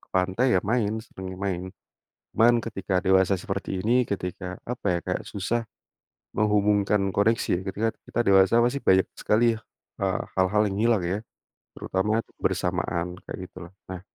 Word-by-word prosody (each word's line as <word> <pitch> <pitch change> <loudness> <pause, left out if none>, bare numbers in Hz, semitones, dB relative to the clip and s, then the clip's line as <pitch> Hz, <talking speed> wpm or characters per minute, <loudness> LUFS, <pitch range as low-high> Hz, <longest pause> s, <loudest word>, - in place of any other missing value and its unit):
ke - - -25
pantai 95 +6 +1
ya - - +3
main 110 0 +1
seringnya, 95 -3 -8
main 95 -2 -3 0.7
cuman 120 +1 +5
ketika 95 -4 -2
dewasa 95 0 +4
seperti 95 0 -3
ini 120 +3 +3
ketika 90 -1 -4 0.3
apa 125 - -7
ya 85 - 0
kayak - - -2
susah, 110 +4 -2 0.7
menghubungkan 105 -1 +2
koneksi 100 -2 +1
ketika 105 +3 -1 0.2
kita - - -3
dewasa 100 +2 +5
pasti 120 +3 +1
banyak 95 -8 +3
sekali 110 +3 +2
ya, - - -12 0.4
eee, 95 -3 0 0.2
hal-hal 95 +3 +3
yang 95 - -4
hilang 115 -1 +3
ya, 100 - -1 0.6
terutama 105 +4 0
kebersamaan 90 +1 -2
kayak - - -7
gitu - - -48
lah. 85 - -13 0.2
Nah, 95 -1 -6
100 Hz, 155 wpm, -26 LUFS, 95-110 Hz, 0.7 s, cuman